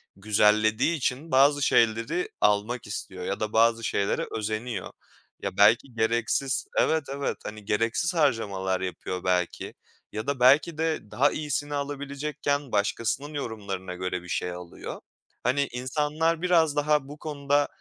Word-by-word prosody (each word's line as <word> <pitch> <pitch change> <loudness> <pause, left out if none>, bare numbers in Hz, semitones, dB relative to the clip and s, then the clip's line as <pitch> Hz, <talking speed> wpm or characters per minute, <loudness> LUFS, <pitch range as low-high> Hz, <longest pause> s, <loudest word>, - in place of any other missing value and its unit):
güzellediği 110 - +3
için 140 +3 -2
bazı 140 +2 +5
şeyleri 115 +9 +2
almak 105 +3 +1
istiyor 95 -3 -6
ya 100 - -2
da 110 0 -3
bazı 115 +1 +4
şeylere 100 -2 0
özeniyor. 110 -1 -3 0.5
Ya, - - -4
belki 115 +5 +5
gereksiz... 115 +4 0
Evet, 160 -1 +3
evet. 140 0 -2
Hani, 105 -1 -7
gereksiz 115 - 0
harcamalar 100 - +1
yapıyor 90 0 -4
belki 90 -1 -1 0.4
ya 110 +3 -5
da 140 -2 -1
belki 145 +6 +5
de 160 -9 -2
daha 135 +7 +3
iyisini 145 -1 -2
alabilecekken 145 0 -3
başkasının 115 +8 -1
yorumlarına 100 -9 -5
göre 90 0 -3
bir - - -12
şey 90 - -1
alıyor. 90 -1 -8 0.4
Hani, 140 +3 +2
insanlar 150 +6 0
biraz 165 -5 +3
daha 150 -1 +2
bu 145 +2 -9
konuda 145 -1 0
125 Hz, 135 wpm, -27 LUFS, 105-145 Hz, 0.5 s, bazı